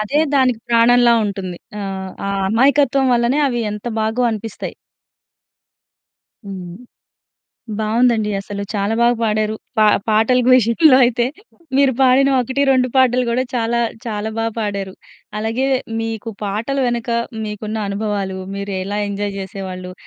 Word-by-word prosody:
అదే 215 +8 0 0.2
దానికి 255 -4 +3
ప్రాణంలా 235 +1 +5
ఉంటుంది. 190 -3 -4 0.2
ఆ! - - -4 0.5
ఆ - - -1 0.2
అమాయకత్వం 275 +4 +3
వల్లనే, 240 +4 +1
అవి 240 -2 -2
ఎంత 210 0 -8 0.2
బాగో 220 +3 0
అనిపిస్తాయి. 220 -1 -6 1.7
హ్మ్. 180 -3 -7 1.0
బావుందండి 220 0 +2
అసలు. 200 +1 -6
చాలా 205 +1 0
బాగా 240 +1 +4
పాడారు. 215 0 0 0.2
పా 215 - +5 0.2
పాటలకి 240 +4 +3
విషయంలో 255 +4 +5
అయితే, 240 0 +1 0.5
మీరు 275 -1 +4
పాడిన 265 +1 +5
1, 260 +3 -1
2 255 -1 +3
పాటలు 255 -1 +4
గూడా 245 +2 +1
చాలా, 235 -1 0 0.3
చాలా 215 -1 -3
బా 225 - 0
పాడారు. 200 -3 -3 0.4
అలాగే 225 +5 -1 0.3
మీకు 225 0 -4
పాటల 215 +7 -2
వెనక, 240 0 -2 0.3
మీకున్న 215 +1 -5
అనుభవాలు, 200 -2 -2 0.2
మీరు 200 0 -4
ఎలా 200 +2 -3
ఎంజాయ్ 200 0 -3
జేసేవాళ్ళు, 190 -2 -6
225 Hz, 125 wpm, -18 LUFS, 205-245 Hz, 1.7 s, ప్రాణంలా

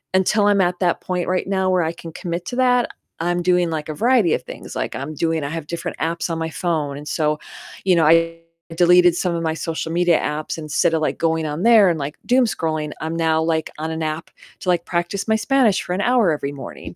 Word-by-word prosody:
until 205 +2 +3
I'm 200 -1 +4
at 175 0 0
that 175 -2 +1
point 180 -1 -2
right 185 0 -1
now 190 -1 0
where 180 -2 +2
I 160 +1 -2
can 165 -1 -10
commit 175 -1 -4
to 245 - -4
that, 250 -1 +3 0.3
I'm 175 +1 0
doing, 180 -1 +2
like, 155 -1 -4
a - - -2
variety 230 - +3
of - - -1
things. - - -9
Like, - - -3
I'm 140 +4 -5
doing 160 -1 0
I 140 - -3
have 160 -2 -5
different 170 - -5
apps 165 +2 -2
on 165 - -2
my 160 0 -2
phone 150 -2 -2
and 150 +1 -9
so, 150 +1 0 0.5
you 185 -2 +4
know, 165 -2 +3
I 165 +1 +3 0.4
deleted 175 0 +5
some 175 -1 -1
of 165 - -2
my 160 -1 0
social 165 0 -4
media 175 -1 +3
apps, 150 +2 -3
instead 155 +1 0
of, 155 - 0
like, - - -1
going 160 -1 0
on 150 +4 -4
there 220 -5 +6
and, 165 -3 -1
like, 140 +2 -4
doom 250 0 +4
scrolling, 155 -7 -2
I'm 160 +1 -3
now, 160 -1 +1
like, 160 -1 0
on 160 +1 -3
an 160 0 -4
app 155 +2 -4 0.3
to, 185 - -3
like, 175 -1 +1
practice 175 +4 -2
my 220 - +3
Spanish 250 -5 +2
for 180 - -4
an 195 - -1
hour 240 -8 +3
every 145 -2 -2
morning 135 - -9
170 Hz, 240 wpm, -21 LUFS, 160-185 Hz, 0.5 s, there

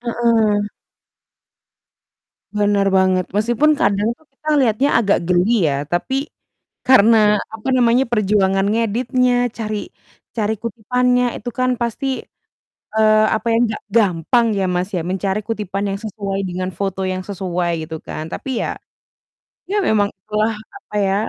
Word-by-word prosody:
Heeh. 230 -3 +1 1.9
Benar 205 -1 +2
banget, 185 -1 +3
meskipun 235 +9 +2
kadang 205 +3 +2
tuh 315 +6 -19
kita 300 +3 -10
liatnya 255 +2 +2
agak 200 -5 +1
geli 180 +3 +2
ya, 140 +1 -3
tapi 265 - -1 0.6
karena, 215 -4 +5
apa 220 +4 -6
namanya, 245 +1 +4
perjuangan 195 -3 +2
ngeditnya, 245 +2 +1
cari 215 -1 -3 0.6
cari 220 -1 0
kutipannya, 250 +2 +1
itu 245 - -6
kan 255 0 +2
pasti, 235 +4 -2 0.9
eee, 215 0 +4
apa 220 - -7
ya, 225 - +3 0.2
gak 215 - -7
gampang 210 +3 +3
ya, 195 - +1
Mas, 180 +1 -1
ya, 170 - -1
mencari 190 +3 -2
kutipan 205 -3 -3
yang 195 - -3
sesuai 200 -2 -4
dengan 185 +1 -3
foto 195 -1 -2
yang 185 0 -2
sesuai, 180 -3 -2 0.2
gitu 160 - -5
kan. 155 +1 -6
Tapi 270 - -5
ya, - - -3 0.9
ya 415 - +1
memang 210 - +2
itulah, 215 +3 -1 0.2
apa 390 - -13
ya, 195 0 +1
215 Hz, 135 wpm, -19 LUFS, 195-235 Hz, 1.9 s, karena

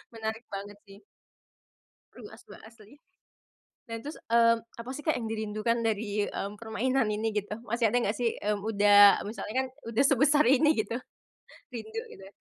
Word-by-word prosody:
Menarik 220 +1 -4
banget 205 +1 -8
sih. 200 +1 -16 1.1
Seru - - -12
asba - - -14
asli. 225 +4 -17 0.9
Nah 230 - -5
terus, 295 +3 -7 0.2
eee, 230 0 +6 0.3
apa 240 - -10
sih 285 +2 -7
Kak, 315 - +2
yang 225 -2 -4
dirindukan 220 +1 -1
dari, 210 -1 -1
mmm, 200 +1 -5
permainan 230 +2 0
ini 215 +1 -1
gitu 205 +1 -3 0.2
masih 235 +1 +1
ada 240 - +1
nggak 205 - -1
sih, 240 -2 +1
mmm, 210 0 -2
udah 205 -1 +6
misalnya 215 -1 -6
kan - - -5 0.2
udah 230 +4 +2
sebesar 285 +2 +4
ini 280 +3 +4
gitu? 230 +3 -6 0.8
Rindu 225 -2 -6
gitu? 195 - -12
225 Hz, 160 wpm, -28 LUFS, 210-240 Hz, 1.1 s, eee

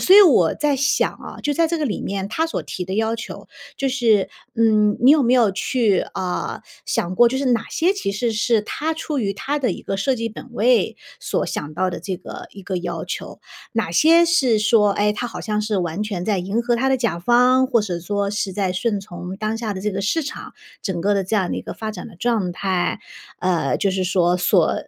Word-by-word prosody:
所 370 - +6
以 415 - +11
我 240 - +5
在 295 -2 +1
想 280 +1 +1
啊， - - -10
就 295 - 0
在 330 +3 +2
这 335 +1 -1
个 305 - -1
里 225 -8 -2
面 195 0 -3
他 320 +10 0
所 330 - -3
提 180 - -5
的 190 +1 -4
要 220 +2 0
求， 230 - -8 0.3
就 275 - 0
是， 230 -7 +2 0.3
嗯， 215 -2 +3
你 250 +3 +6
有 305 +1 +6
没 240 - +3
有 240 -5 +4
去 205 0 +1 0.2
呃， 180 -1 -3 0.3
想 175 +2 -1
过 240 0 +6
就 260 - -2
是 275 +1 -1
哪 240 -3 +2
些 350 +4 +2
其 390 - -3
实 235 +3 -1
是 220 0 +1
他 315 +8 -3
出 310 -2 -3
于 200 -4 0
他 280 +9 -2
的 250 -8 0
一 - - -8
个 195 - -3
设 260 +7 +1
计 230 -1 -3
本 225 - -10
位 240 -2 +2 0.2
所 - - -1
想 150 +1 -5
到 185 +1 0
的 - - -5
这 190 -2 -4
个 - - -9
一 195 - -11
个 185 0 -3
要 175 -2 -4
求？ - - -6 0.3
哪 225 -8 -1
些 330 - +5
是 265 -10 +3
说， 210 -1 +4
唉， 210 +1 +1
他 245 +3 -3
好 235 - -7
像 210 -1 -1
是 210 -1 -1
完 175 +1 -2
全 195 -4 -3
在 205 -3 +1
迎 195 +6 -1
合 240 0 +1
他 265 +3 +1
的 265 - +3
甲 225 -9 -1
方， 250 +6 +4
或 245 -3 +2
是 185 -5 -3
说 200 +3 -1
是 205 -1 -2
在 190 -1 -1
顺 205 +2 -1
从 180 -1 -8
当 215 +2 -2
下 225 -2 -3
的 190 - -6
这 210 +2 -1
个 195 0 -3
市 320 +11 0
场， 285 - -7 0.3
整 185 -4 -2
个 205 +4 +2
的 195 -1 0
这 205 - -2
样 190 -4 +1
的 - - -2
一 - - -5
个 - - -6
发 220 -1 -5
展 190 -4 -8
的 - - -13
状 215 -4 0
态， 185 -1 -1 0.4
呃， 175 -6 0
就 195 - +1
是 190 0 -1
说 180 -1 +2
所 180 -2 +3
210 Hz, 260 characters per minute, -21 LUFS, 190-245 Hz, 0.4 s, 以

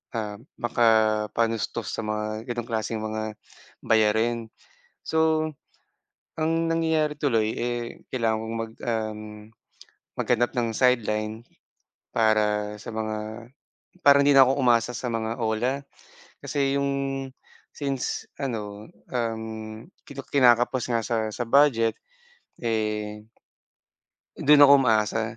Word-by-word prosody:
ah, 105 -2 -3 0.2
makapanustos 110 -1 +1
sa - - -4
mga 110 +1 -3
ganong 120 0 -5
klaseng 110 -1 -2
mga 110 0 -3 0.5
bayarin. 110 +1 +2 0.6
So, 160 0 +1 0.9
ang 165 +1 +1
nangyayari 160 -2 +1
tuloy 115 -7 +1
eh, 120 0 -2 0.3
kailangan 115 -3 +1
kong 115 +1 -5
mag 115 0 -4
um, 110 -2 -2 1.0
maghanap 120 0 +1
ng 120 -1 +1
sideline 110 -3 +1 0.7
para 105 -1 +2
sa - - -11
mga 110 +1 -4 0.6
para 140 0 +7
hindi 140 0 +4
na 135 - +9
ako 135 +2 +1
umasa 120 -1 +3
sa 125 - -4
mga 115 +1 -2
OLA. 120 +5 0 0.6
Kasi 140 -1 0
'yong 140 0 0 0.8
since 135 -3 -3
ano, 105 -6 -5 0.2
um, 110 -2 -4 0.2
kina 140 -1 -7
kinakapos 125 -1 +3
nga 115 - +1
sa 115 - 0 0.2
sa 120 - -2
budget 115 -4 +4 0.6
eh 105 -2 -2 1.2
doon 145 0 +7
ako 140 - +7
umaasa. 110 -2 +2
115 Hz, 110 wpm, -25 LUFS, 110-130 Hz, 1.2 s, na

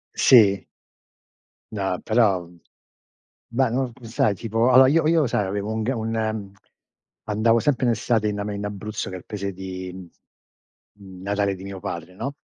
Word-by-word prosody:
Sì. 100 -6 +5 1.1
No, 95 -3 -2
però, 105 -6 +2 1.0
beh, 130 +1 +1
n 125 0 -1
sai 110 -2 +1
tipo 115 +5 0
allora 130 +1 +8
io 155 +1 +3
io 160 -3 +3
sai 105 -3 0
avevo 100 +2 -3
un 110 0 -2
g 125 - 0
un 115 0 -3 1.1
andavo 115 +2 +3
sempre 130 -2 +1
in 120 - +4
estate 110 -1 0
in 105 0 -3
ame 100 0 -3
in 100 - -5
Abruzzo 105 0 -5
che - - -7
è - - -6
il - - -15
paese 100 -2 -4
di 95 -1 -7 1.0
natale 100 0 -3
di 95 - -11
mio 100 -1 -7
padre 85 0 -6
no, 140 +5 -4
105 Hz, 160 wpm, -23 LUFS, 95-115 Hz, 1.1 s, allora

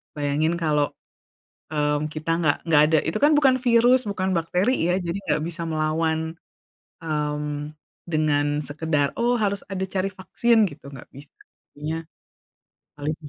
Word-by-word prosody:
bayangin 150 +2 0
kalo, 150 -3 +1 0.8
mmm, 150 0 0
kita 155 +1 -4
enggak 150 -4 +2
enggak 150 -3 +5
ada 160 - +5
itu - - -1
kan 295 - +6
bukan 265 -3 +4
virus, 245 +1 +5
bukan 190 -1 -1
bakteri 180 +9 +1 0.2
ya. - - +2
Jadi 175 +1 -3
enggak 150 +1 +1
bisa 170 0 -6
melawan, 160 +1 -1 0.7
mmm, 150 -1 -3 0.3
dengan 155 -3 +1 0.2
sekedar, 145 -1 -1
oh 240 +1 +2
harus 200 -2 0
ada 190 0 -2
cari 190 +1 -2
vaksin 220 +4 +2
gitu, 145 -2 -14
nggak 135 - -11
bisa, 145 +2 -13 0.4
artinya 150 +2 -4 1.0
paling 150 +2 -2
sih 150 - -10
160 Hz, 145 wpm, -24 LUFS, 150-185 Hz, 1.0 s, kan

